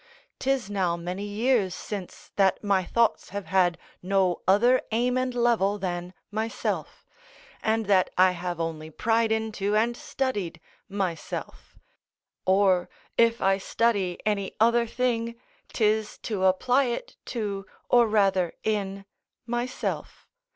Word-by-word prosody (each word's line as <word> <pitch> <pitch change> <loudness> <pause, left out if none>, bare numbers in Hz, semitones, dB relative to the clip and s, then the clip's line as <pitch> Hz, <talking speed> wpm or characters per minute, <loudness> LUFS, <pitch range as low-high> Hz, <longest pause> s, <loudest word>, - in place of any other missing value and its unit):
'Tis 265 -4 0
now 185 -4 0
many 180 +4 -4
years 205 -2 +1
since 195 -3 -7
that 195 0 +2
my 200 -2 +2
thoughts 230 +4 +1
have 200 0 -5
had 180 -3 +2 0.2
no 185 -1 +1
other 240 +7 +5
aim 245 +3 +1
and 255 -1 -1
level 230 -4 +2
than 180 -2 -3 0.2
myself, 220 +2 -3 0.6
and 220 0 +1
that 190 -2 +3
I 185 0 +6
have 175 -1 -4
only 160 -1 -3
pried 225 +6 +1
into 215 -2 0
and 230 +2 +2
studied 205 -13 -3 0.3
myself: 190 -5 -4 0.7
or, 190 -2 +3 0.3
if 230 0 +3
I 195 0 +3
study 195 -4 0
any 200 -2 -1
other 235 +1 +4
thing, 235 -1 -1 0.4
'tis 215 -1 +1
to 200 -4 -1
apply 250 +9 +3
it 255 - -4
to 200 -5 -4 0.2
or 240 -1 +5
rather 195 -5 +2
in 200 -2 -2 0.4
myself. 240 +1 -3
205 Hz, 125 wpm, -26 LUFS, 185-230 Hz, 0.7 s, I